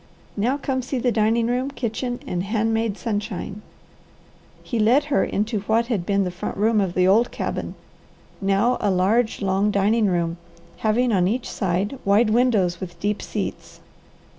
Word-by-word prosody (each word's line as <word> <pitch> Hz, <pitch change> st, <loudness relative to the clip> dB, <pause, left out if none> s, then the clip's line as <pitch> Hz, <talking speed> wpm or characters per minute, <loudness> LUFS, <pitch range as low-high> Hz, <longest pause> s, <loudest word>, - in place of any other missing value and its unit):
Now 240 Hz, +7 st, +1 dB
come 265 Hz, -2 st, -2 dB
see 255 Hz, +2 st, -3 dB
the 245 Hz, 0 st, +1 dB
dining 225 Hz, +1 st, +2 dB
room, 250 Hz, +3 st, 0 dB
kitchen, 245 Hz, -1 st, -3 dB
and 175 Hz, -, -2 dB
hand 220 Hz, +3 st, 0 dB
made 225 Hz, -2 st, -1 dB
sunshine." 205 Hz, -2 st, -4 dB, 1.0 s
He 235 Hz, -, -3 dB
led 240 Hz, +7 st, +4 dB
her 195 Hz, -, +4 dB
into 210 Hz, +2 st, -1 dB
what 220 Hz, +4 st, +1 dB
had 175 Hz, -5 st, -2 dB
been 200 Hz, -1 st, +2 dB
the 180 Hz, -, -2 dB
front 175 Hz, -, -5 dB
room 215 Hz, +1 st, +3 dB
of 185 Hz, -3 st, -2 dB
the 185 Hz, 0 st, +3 dB
old 220 Hz, +5 st, +4 dB
cabin, -, -, -4 dB, 0.7 s
now 200 Hz, +6 st, +2 dB
a 205 Hz, -, +1 dB
large, 205 Hz, +5 st, +1 dB
long 195 Hz, +2 st, +2 dB
dining 210 Hz, +2 st, +2 dB
room 170 Hz, -2 st, 0 dB, 0.4 s
having 235 Hz, +3 st, +1 dB
on 180 Hz, -2 st, +3 dB
each 235 Hz, +5 st, -1 dB
side 195 Hz, +6 st, -2 dB
wide 210 Hz, +3 st, +3 dB
windows 215 Hz, -8 st, +2 dB
with 175 Hz, -2 st, -7 dB
deep 205 Hz, +1 st, -1 dB
seats. -, -, -5 dB
215 Hz, 165 wpm, -23 LUFS, 195-235 Hz, 1.0 s, led